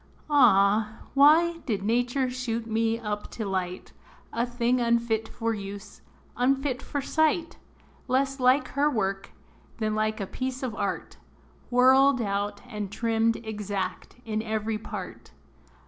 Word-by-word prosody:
Ah! 215 -4 +4
why 325 +4 +5
did 205 -5 -1
nature 245 +4 +1
shoot 245 -2 -3
me 225 0 0
up 210 -2 -4
to 220 - -5
light, 185 -2 -3 0.4
A 235 +1 0
thing 245 +1 +1
unfit 235 -1 +1
for 230 -1 -2
use 200 0 -8 0.3
unfit 265 +1 +1
for 285 - -3
sight; 315 +3 0 0.5
Less 270 +1 0
like 255 +3 +3
her 285 +2 +2
work, 195 -5 -2 0.5
than 215 -2 -1
like 215 0 0
a 200 - -2
piece 260 +5 -4
of 250 -4 -2
art, - - -4 0.5
Whirled 260 +2 +5
out 205 -1 -2
and 210 -2 -5
trimmed 225 0 +1
exact 205 -3 -4
in 220 -1 -2
every 220 0 -2
part? - - -8
230 Hz, 130 wpm, -27 LUFS, 210-255 Hz, 0.5 s, why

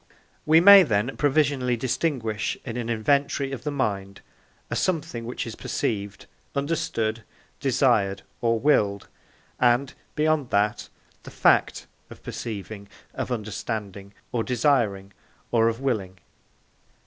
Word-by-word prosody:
We 160 +1 +7
may 200 +3 +10
then 115 - 0
provisionally 140 -4 +1
distinguish 115 -4 -1
in 120 -3 -5
an 120 -1 -4
inventory 140 +4 +1
of 135 - -6
the 150 - -2
mind 100 -8 -3 0.5
a - - -1
something 150 -10 -2
which 120 - -4
is 115 - -7
perceived, 100 -2 -3 0.3
understood, 140 -7 -1 0.4
desired, 100 0 +1 0.2
or 115 -1 +1
willed, 105 -8 +1 0.5
and, 125 +2 +2 0.2
beyond 155 -3 +1
that, 105 +1 0 0.3
the - - -11
fact - - +2 0.2
of - - -13
perceiving, 100 -2 -6 0.3
of - - -4
understanding, 105 -3 -5 0.2
or 115 -2 0
desiring, 115 -7 +1 0.4
or 115 -1 +3
of 115 +1 -4
willing. 105 -9 -2
115 Hz, 120 wpm, -25 LUFS, 105-140 Hz, 0.5 s, may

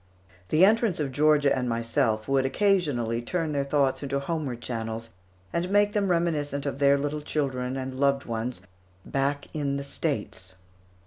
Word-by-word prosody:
The 165 +5 +6
entrance 220 -3 +2
of 145 -3 -1
Georgia 145 0 +4
and 125 -1 -1
myself 115 -2 0
would 135 -1 +2
occasionally 135 - +1
turn 165 +5 -2
their 140 -1 0
thoughts 140 -1 +1
into 140 -1 -1
homeward 140 -4 -3
channels, 115 -1 -4 0.4
and 175 +2 -1
make 205 +1 +4
them 205 -2 0
reminiscent 150 -5 0
of 140 -1 -3
their 140 0 +5
little 145 +2 -2
children 130 -4 -2
and 130 0 -4
loved 140 0 +2
ones 115 -2 -3 0.4
"back 140 +1 -1
in 140 -2 -1
the 140 - -4
States." 95 -8 -3
140 Hz, 155 wpm, -27 LUFS, 125-155 Hz, 0.4 s, The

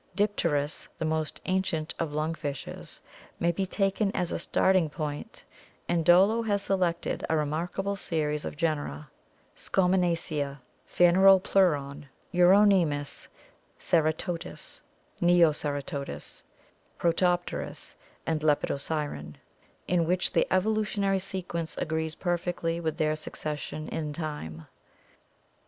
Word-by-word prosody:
Dipterus, 165 -8 0
the 160 - -2
most 155 0 -1
ancient 185 -4 -1
of 165 -3 -1
lung 155 +2 -1
fishes, 145 -4 -6 0.4
may 170 - +2
be 190 +3 -2
taken 195 +1 +1
as 180 -2 -1
a - - -2
starting 185 -1 +2
point 150 -1 -5 0.4
and 170 -1 +1
Dollo 190 +7 +5
has 205 -3 0
selected 180 -3 0
a 160 - +2
remarkable 170 +6 -1
series 150 -5 -2
of - - -6
genera, 145 - -2 0.4
Scautnenacia, 170 -6 0 0.3
Phaneropleuron, 175 -5 +4 0.3
Urone 185 0 +6
muSy 145 -1 -4 0.5
Ceratodus 165 +2 -1 0.4
(Neoceratodus), 150 -5 +1 0.6
Protopterus 175 +1 0 0.2
', - - -33
and 160 -1 0
Lepidosiren, 145 - -1 0.5
in 175 -2 +2
which 180 +1 0
the - - +3
evolutionary 200 0 +1
sequence 180 -3 -4
agrees 160 0 -1
perfectly 175 -2 -1
with 160 -2 -2
their 155 0 +2
suces 155 -1 -5
sion 155 +2 -6
in 150 -2 -3
time. 145 - -5
165 Hz, 105 wpm, -28 LUFS, 150-185 Hz, 0.6 s, Urone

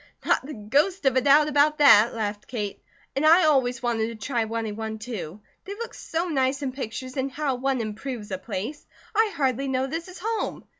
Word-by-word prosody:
"Not - - +2
the 295 +3 -7
ghost 285 - 0
of 265 -2 +3
a 260 - +4
doubt 290 +3 +5
about 300 +1 +3
that," 235 -6 +6
laughed 210 -2 -3
Kate, 210 -5 -4 0.3
"and 275 - 0
I 330 +4 +7
always 260 -5 +2
wanted 230 -2 0
to 230 - -6
try 240 -5 +1
running 220 -1 -3
one, 220 0 -4
too. 215 -5 -7 0.2
They 400 +2 -6
look 465 +2 -6
so 330 +2 -3
nice 270 -3 0
in 265 - -1
pictures, 255 0 -6
and 265 +1 0
how 285 -1 -1
one 260 +1 -1
improves 215 0 -5
a 190 - -3
place! 215 +10 -5 0.3
I 440 0 +3
hardly 270 -1 0
know 260 0 0
this 325 +6 -4
is 370 0 -10
home. 445 +4 -3
260 Hz, 205 wpm, -25 LUFS, 225-300 Hz, 0.3 s, I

